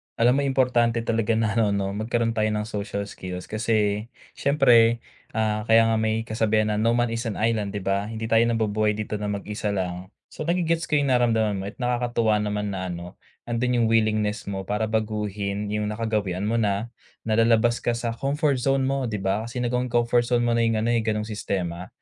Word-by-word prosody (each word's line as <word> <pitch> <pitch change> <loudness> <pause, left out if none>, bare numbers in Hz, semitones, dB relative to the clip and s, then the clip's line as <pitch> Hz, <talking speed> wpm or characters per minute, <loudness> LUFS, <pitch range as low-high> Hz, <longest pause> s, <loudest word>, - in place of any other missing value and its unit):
Alam 125 +4 +3
mo - - +2
importante 120 -3 +2
talaga 115 -1 +1
na 110 -1 +1
ano 105 -3 +2
'no 100 -1 -1
magkaroon 115 +3 -1
tayo 110 -1 0
ng 105 0 -1
social 100 -1 -4
skills 90 -2 -7
kasi 110 -1 0 0.2
siyempre 120 -5 +4 0.3
ah, 110 0 0
kaya 115 0 +6
nga 110 - +2
may 110 0 0
kasabihan 110 -1 +1
na, 105 - 0
"No 115 +2 +2
man 120 -1 +1
is 115 +1 -3
an 110 - -3
island," 110 -3 0
di 100 - -4
ba? 100 +2 0
Hindi 110 0 -6
tayo 115 - +5
nabubuhay 110 -2 +1
dito 105 0 -4
na 105 - -3
mag-isa 105 0 -3
lang. 90 -1 -3 0.2
So, - - -6
nage-gets 170 -1 0
ko - - +4
yung 140 - 0
nararamdaman 115 -4 +2
mo - - -5
at - - -8
nakakatuwa 120 -3 +1
naman 105 -1 -2
na 95 -1 -3
ano 85 0 -7 0.3
nandun 120 +1 0
yung 115 - +3
willingness 110 -2 +1
mo 95 -1 -3
para 105 +2 -1
baguhin 105 -2 -2
yung 105 0 -1
nakagawian 105 -4 -2
mo 115 - 0
na 105 +2 0 0.4
nalalabas 115 +1 +3
ka - - +2
sa 120 0 -2
comfort 140 +2 0
zone 135 +1 +1
mo, 135 -1 0
di 110 - -3
ba? 100 +3 0
Kasi 125 +1 -5
nagawang 125 +1 0
comfort 120 0 +2
zone 120 -1 +2
mo - - +2
na 115 - +2
yung 115 - +1
ano 115 - 0
yung 115 -2 +1
ganong 105 0 -1
sistema. 90 -4 -3
110 Hz, 200 wpm, -24 LUFS, 105-120 Hz, 0.4 s, kaya